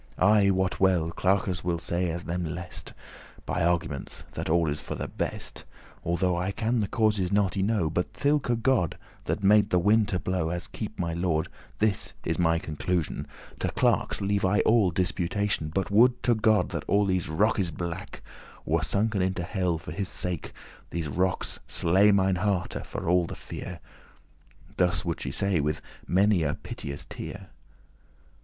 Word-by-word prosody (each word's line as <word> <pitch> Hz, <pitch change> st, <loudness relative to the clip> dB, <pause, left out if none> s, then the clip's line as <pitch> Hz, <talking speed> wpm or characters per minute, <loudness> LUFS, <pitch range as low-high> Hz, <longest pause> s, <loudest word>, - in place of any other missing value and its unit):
I 100 Hz, +1 st, +5 dB
wot 95 Hz, -1 st, +1 dB
well, 90 Hz, -4 st, +3 dB
clerkes 95 Hz, 0 st, 0 dB
will 85 Hz, -1 st, 0 dB
say 85 Hz, +2 st, -1 dB
as 85 Hz, +1 st, -3 dB
them 90 Hz, +1 st, -2 dB
lest,* 80 Hz, -1 st, -6 dB
*please -, -, -16 dB
By 90 Hz, -, -1 dB
arguments, 85 Hz, -5 st, -1 dB
that -, -, -4 dB
all 85 Hz, 0 st, +3 dB
is 75 Hz, -, -4 dB
for -, -, -5 dB
the -, -, -4 dB
best, -, -, -4 dB, 0.4 s
Although 85 Hz, +1 st, +1 dB
I 90 Hz, +3 st, -1 dB
can 115 Hz, +3 st, 0 dB
the 105 Hz, -, 0 dB
causes 105 Hz, -4 st, +1 dB
not 100 Hz, -2 st, +2 dB
y 95 Hz, -, 0 dB
know; 100 Hz, -4 st, +1 dB
But 85 Hz, +3 st, -1 dB
thilke* 140 Hz, -5 st, +1 dB
God 125 Hz, -, +2 dB, 0.3 s
that -, -, -2 dB
made 105 Hz, +1 st, +5 dB
the 90 Hz, -, +3 dB
wind 105 Hz, +4 st, +4 dB
to 95 Hz, -, -1 dB
blow, 90 Hz, -3 st, -1 dB
*that 85 Hz, -, -1 dB
As 85 Hz, +2 st, -4 dB
keep 110 Hz, -, -6 dB
my 85 Hz, -1 st, -1 dB
lord, 85 Hz, -2 st, 0 dB, 0.3 s
this 105 Hz, -2 st, 0 dB
is 80 Hz, -, -1 dB
my 85 Hz, -1 st, +3 dB
conclusion: 80 Hz, +1 st, -2 dB, 0.3 s
To -, -, 0 dB
clerks -, -, +1 dB
leave 100 Hz, 0 st, 0 dB
I 100 Hz, +3 st, +3 dB
all 110 Hz, -4 st, +4 dB
disputation: 90 Hz, 0 st, -1 dB
But 95 Hz, +4 st, -1 dB
would 120 Hz, +4 st, +5 dB
to 120 Hz, -, +4 dB
God 110 Hz, -1 st, +3 dB
that -, -, -4 dB
all 100 Hz, 0 st, +3 dB
these 95 Hz, -4 st, 0 dB
rockes 95 Hz, +2 st, +2 dB
blake 85 Hz, +2 st, -6 dB, 0.4 s
Were -, -, +1 dB
sunken 105 Hz, 0 st, +1 dB
into 95 Hz, -1 st, 0 dB
helle 90 Hz, -1 st, 0 dB
for 90 Hz, +3 st, -8 dB
his 100 Hz, -1 st, -3 dB
sake 90 Hz, -5 st, -3 dB, 0.4 s
These 85 Hz, -3 st, -3 dB
rockes 95 Hz, +5 st, -1 dB
slay 95 Hz, +5 st, +4 dB
mine 95 Hz, -2 st, +3 dB
hearte 95 Hz, -1 st, -1 dB
for 90 Hz, 0 st, +1 dB
the -, -, -6 dB
fear." -, -, -7 dB, 1.0 s
Thus 90 Hz, -1 st, +2 dB
would 85 Hz, -1 st, -2 dB
she -, -, -3 dB
say, 100 Hz, -3 st, +1 dB
with 75 Hz, +1 st, 0 dB, 0.3 s
many 95 Hz, 0 st, +3 dB
a 75 Hz, -2 st, 0 dB
piteous 70 Hz, 0 st, -6 dB
tear. -, -, -8 dB
90 Hz, 175 wpm, -27 LUFS, 85-100 Hz, 1.0 s, I